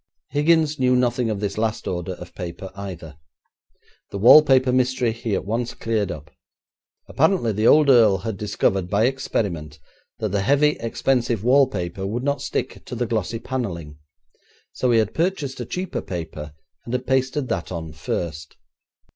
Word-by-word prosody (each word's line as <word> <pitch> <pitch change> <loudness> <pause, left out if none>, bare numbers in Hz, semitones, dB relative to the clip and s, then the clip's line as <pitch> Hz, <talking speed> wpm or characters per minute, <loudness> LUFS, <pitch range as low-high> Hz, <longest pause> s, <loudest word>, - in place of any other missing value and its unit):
Higgins 155 0 +2
knew 125 -1 +3
nothing 125 -1 +1
of 105 -2 -2
this 100 0 -3
last 110 -1 -2
order 90 +1 -3
of 90 0 -11
paper 90 +1 -7
either. 90 -6 -8 0.9
The - - -5
wallpaper 130 +3 +7
mystery 125 -2 +1
he 115 -2 -3
at - - -3
once 115 +3 -2
cleared 110 -4 -1
up. 75 -2 -9 0.8
Apparently 160 - +2
the 110 +2 +1
old 150 -1 +6
earl 115 -7 +6
had 105 +3 -4
discovered 95 -2 -1
by 105 +3 +2
experiment 95 - -2 0.4
that 110 - -2
the 100 +1 0
heavy, 140 +7 +4
expensive 115 -2 0
wallpaper 105 -8 +1
would 120 +5 -3
not 140 0 -1
stick - - -4
to 125 - -6
the 120 +1 -1
glossy 110 -1 -2
panelling, 90 - -5 0.7
so 130 - 0
he 120 - +4
had 110 -2 +1
purchased 160 -7 -1
a 120 - -5
cheaper 185 0 -3
paper, 80 -4 -7 0.3
and 120 - -3
had 125 0 -3
pasted 130 +1 0
that 90 -6 -3
on 80 -3 -5
first. 80 0 -5
115 Hz, 160 wpm, -22 LUFS, 95-130 Hz, 0.9 s, wallpaper